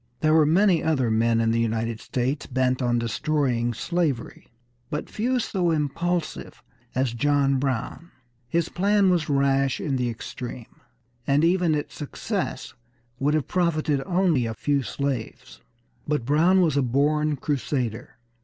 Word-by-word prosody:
There 155 0 +3
were 155 -2 +5
many 180 +2 +4
other 130 -8 +1
men 115 +1 +2
in 115 0 +2
the 115 - +1
United 115 0 -1
States 130 +3 -2
bent 130 0 0
on 120 -1 +1
destroying 120 0 0
slavery, 160 -5 -2 0.4
but 150 - -4
few 250 +4 0
so 190 -7 0
impulsive 165 +2 -2 0.3
as 130 -2 0
John 140 +1 +2
Brown. 135 +5 -3 0.4
His 170 +4 +1
plan 200 +1 +2
was 170 -4 0
rash 135 -1 +2
in 135 -3 -1
the 125 -1 0
extreme, 120 +1 -8 0.5
and 140 +2 +3
even 175 -2 +3
its 145 - -4
success 190 +7 -4 0.5
would 145 +3 +2
have 155 - -1
profited 155 -5 0
only 175 -9 +2
a 110 - -4
few 145 +4 0
slaves. 135 -3 -4 0.5
But 150 -5 -1
Brown 165 +7 +4
was 160 -5 +2
a 140 - +3
born 145 +4 +1
crusader. 130 -5 -3
145 Hz, 145 wpm, -25 LUFS, 125-165 Hz, 0.5 s, were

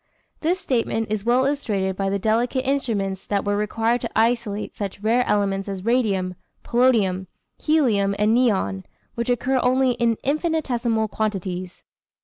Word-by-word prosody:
This 350 +4 0
statement 225 -5 -1
is 215 -1 -2
well 250 +2 +3
illustrated 205 -10 -1
by 195 0 -1
the 200 - 0
delicate 235 +5 0
experiments 210 -9 -1
that 200 0 -1
were 205 0 +1
required 225 +3 0
to - - -3
isolate 225 -3 0
such 200 -1 -5
rare 230 +4 +2
elements 200 -1 0
as 195 -1 -5
radium, 205 -7 +1 0.3
polonium, 215 -7 +2 0.3
helium 220 -11 +2
and 210 +2 +3
neon, 195 - +1 0.3
which 235 +1 -3
occur 255 +2 +1
only 255 +1 +3
in 235 -2 +1
infinitesimal 260 -7 0
quantities. 185 -4 -4
225 Hz, 140 wpm, -23 LUFS, 200-250 Hz, 0.3 s, well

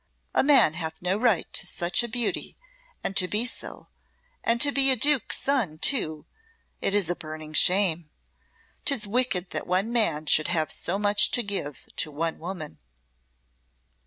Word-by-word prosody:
A - - +3
man 275 - +5
hath 160 -1 -6
no 180 +1 0
right 220 -5 +1
to - - +3
be - - -7
such 175 +4 0
a 240 - -4
beauty 240 0 -3 0.5
and 195 - -3
to 180 - +3
be 210 +5 +1
so, 250 - -8 0.6
and 230 +1 +1
to 285 +3 +5
be 275 -1 +4
a 260 - +5
Duke's 290 -3 +3
son, 240 - -1
too, 160 - +1 0.6
is 200 -3 +1
a 175 - -2
burning 155 -2 -9
shame. 175 -2 +3 0.7
'Tis 260 -7 +1
wicked 200 -5 -1
that - - -4
one 190 +6 0
man 165 -10 +1
should 155 0 +2
have 160 -3 -1
so 185 - -3
much 205 0 +4
to 245 - +1
give 190 - -5
to - - 0
one 160 +2 -3
woman." 170 -3 -7
190 Hz, 165 wpm, -25 LUFS, 160-235 Hz, 0.7 s, man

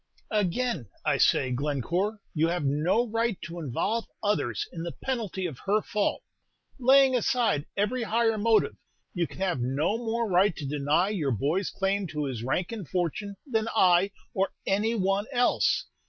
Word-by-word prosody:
"Again, 210 - 0 0.2
I - - +2
say, 130 - +3
Glencore, 150 - -1
you 160 0 +2
have 170 -3 -1
no 155 - +2
right 230 -2 0
to 170 +1 -6
involve 195 - -1 0.2
others 160 - 0
in 165 - -5
the 170 0 -4
penalty 220 -8 -3
of 155 -8 -5
her 210 +2 +4
fault. 210 -1 -1 0.6
Laying 265 +1 +6
aside 235 - +1
every 210 +5 0
higher 225 0 +2
motive, 220 -1 +3 0.4
you 175 -2 0
can - - -13
have 180 -7 0
no 145 - 0
more 230 0 -1
right 190 0 +3
to 145 - -6
deny 150 +6 +1
your 175 -10 -1
boy's 145 - 0
claim 195 0 -1
to 150 -1 -3
his 130 -5 -4
rank 150 - -1
and 210 -9 -6
fortune 185 +3 -2
than 225 -5 0
I 180 +1 +5 0.2
or 195 +1 0
any 210 +4 +1
one 195 +1 0
else. 245 -2 +2
195 Hz, 165 wpm, -27 LUFS, 155-225 Hz, 0.6 s, Laying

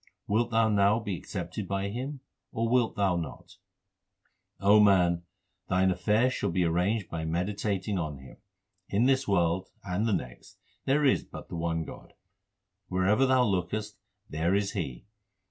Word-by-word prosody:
Wilt 115 +3 +1
thou 115 -1 +3
now 105 0 +3
be 105 -4 -3
accepted 95 +3 -5
by 100 +1 -2
Him, 130 +5 -5 0.3
or 115 +1 -1
wilt 120 -1 +2
thou 100 -4 +2
not? 80 -3 -7 1.0
O 100 +2 +6
man, 90 -4 +4 0.5
thine 95 +1 +3
affairs 105 +8 +2
shall 100 - -1
be 90 +1 +1
arranged 90 +5 +1
by 80 -1 -4
meditating 95 +3 -1
on 75 -4 -3
Him. 65 -1 -14 0.5
In 105 +4 +2
this 135 0 +2
world 90 -2 +1
and 100 +4 -1
the 110 - +1
next 60 -7 -5 0.3
there 145 +2 +2
is 135 - +3
but - - -11
the - - -6
one 80 -1 -1
God; - - -11 0.7
Wherever 100 +8 +2
thou 130 -1 +4
lookest, 105 +1 -2 0.3
there 85 +5 0
is 100 0 0
He. 80 - -5
100 Hz, 155 wpm, -28 LUFS, 90-110 Hz, 1.0 s, O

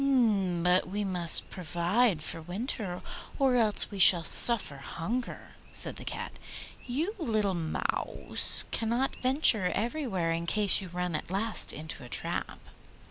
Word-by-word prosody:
'But 180 +1 +1
we 205 +2 -4
must 180 -4 +2
provide 175 +2 -1
for - - -7
the - - -10
winter 195 -2 -6 0.3
or 270 -3 +1
else 220 -3 +2
we 200 - -8
shall 175 -2 +8
suffer 205 - +3
hunger,' 205 - -7 0.2
said - - +6
the - - -10
Cat. - - -7 0.5
'You, 305 - -3
little 215 - -2
Mouse, 165 -3 +2
cannot 235 +4 -2
venture 255 -7 +2
everywhere 225 - -3
in 165 +1 -4
case 205 0 +1
you 190 - -9
run 180 -1 -5
at - - -6
last 210 +4 +1
into 155 -2 -8
a 120 - -12
trap. - - -5
195 Hz, 140 wpm, -27 LUFS, 175-235 Hz, 0.5 s, shall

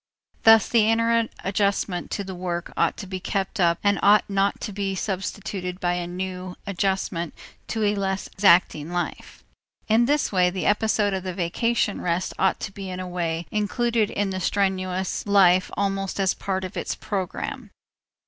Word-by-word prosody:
Thus 225 -1 +7
the 220 -2 +3
inner 230 0 +2 0.2
adjustment 195 -2 0
to 200 - -3
the 190 -1 -7
work 175 -1 -4
ought - - +1
to - - -6
be 190 0 -5
kept 195 +3 -3
up 170 -2 +3
and 200 -1 +3
ought 205 +1 +5
not 195 0 +1
to 210 - -4
be 195 -1 -2
substituted 190 -1 -4
by 175 -1 0
a 175 -1 -3
new 185 0 -5
adjustment 190 -3 -1 0.3
to 220 -2 -2
a 205 0 +3
less 195 -1 -2
exacting 170 -5 +3
life. 175 0 -4 0.4
In 225 +2 +4
this 290 +3 +1
way 180 -2 +3
the 185 0 -4
episode 210 -1 +2
of 190 - -1
the 185 -1 -5
vacation 205 +4 0
rest 175 +1 -1
ought 190 -1 +2
to 195 - -4
be 195 -1 -7
in 185 0 -5
a 185 - -4
way 170 -2 -2
included 220 +1 +1
in 200 -1 -1
the 185 - -3
strenuous 185 0 -1
life 185 -2 +5
almost 195 -1 -1
as 190 -2 +2
a - - -22
part 190 -1 -2
of 185 +1 -6
its - - -3
programme. 190 -3 -4
195 Hz, 175 wpm, -24 LUFS, 180-205 Hz, 0.4 s, Thus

